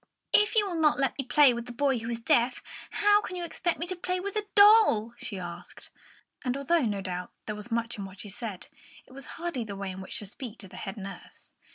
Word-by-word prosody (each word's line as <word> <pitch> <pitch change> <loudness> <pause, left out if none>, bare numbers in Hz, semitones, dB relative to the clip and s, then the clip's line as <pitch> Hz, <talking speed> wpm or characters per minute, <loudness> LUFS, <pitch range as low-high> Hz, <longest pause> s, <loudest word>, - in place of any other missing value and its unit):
"If 420 +2 +4
you 425 -2 +5
will 340 -4 -2
not 300 -1 +4
let 270 -1 +1
me - - 0
play 265 +1 +6
with 235 +1 -6
a - - -5
boy 265 +1 +1
who 230 +1 -5
is 235 -1 -3
deaf, 240 +2 +2 0.3
how 415 0 +4
can 370 - -6
you 355 - -4
expect 345 +1 -2
me 335 - -3
to 370 +1 -3
play 365 +1 -2
with 400 +2 -4
a 420 -1 -2
doll?" 405 - +7
she 205 - -5
asked; 175 -1 -9 0.5
and 255 0 -1
although, 315 +5 +2
no 200 -2 -2
doubt, 180 -1 -4 0.2
there 215 - -3
was 210 +2 -8
much 230 -1 -1
in 200 - -4
what 195 0 -9
she 205 - -8
said, 205 -2 -5 0.4
it - - -20
was 275 0 -10
hardly 335 -7 -3
the 205 -2 -7
way 195 -1 -4
in 185 +1 -7
which 190 - -4
to 210 - -6
speak 230 +2 -8
to 195 - -7
the 185 0 -12
head 195 +3 -6
nurse. 195 -1 -10
240 Hz, 250 wpm, -28 LUFS, 205-340 Hz, 0.5 s, doll